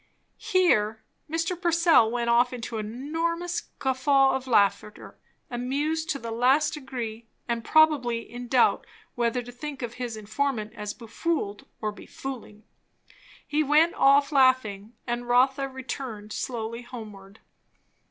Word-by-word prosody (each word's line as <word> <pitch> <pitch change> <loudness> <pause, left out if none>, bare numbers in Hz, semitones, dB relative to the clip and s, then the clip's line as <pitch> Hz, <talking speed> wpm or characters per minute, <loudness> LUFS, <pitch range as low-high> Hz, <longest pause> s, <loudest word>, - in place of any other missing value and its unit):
Here 220 - +2 0.3
Mr. 330 +3 -1
Purcell 335 -9 +4
went 235 0 -2
off 240 +1 +4
into 230 -2 -5
an 210 0 -5
enormous 335 +7 -2 0.2
guffaw 270 +1 +3
of 265 0 -3
laughter, 210 -2 +1 0.4
amused 290 +7 -2
to 290 - 0
the 230 -3 -6
last 260 +6 +3
degree, 240 -6 -6 0.2
and 235 -1 -2
probably 285 -7 +3
in 245 +1 -9
doubt 245 0 +3 0.3
whether 240 +1 0
to 245 - -10
think 270 +2 -7
of 235 -1 -4
his 235 -3 -4
informant 215 +1 -2
as 210 0 -6
befooled 230 -2 -3
or 215 -1 -1
befooling. 225 -2 -9 0.8
He 300 +1 +1
went 310 +3 +4
off 280 +2 +4
laughing; 250 -6 +2
and 240 0 -3
Rotha 265 +3 +3
returned 255 -5 -6
slowly 230 -1 -4
homeward. 210 -5 -11
245 Hz, 130 wpm, -26 LUFS, 225-280 Hz, 0.8 s, Purcell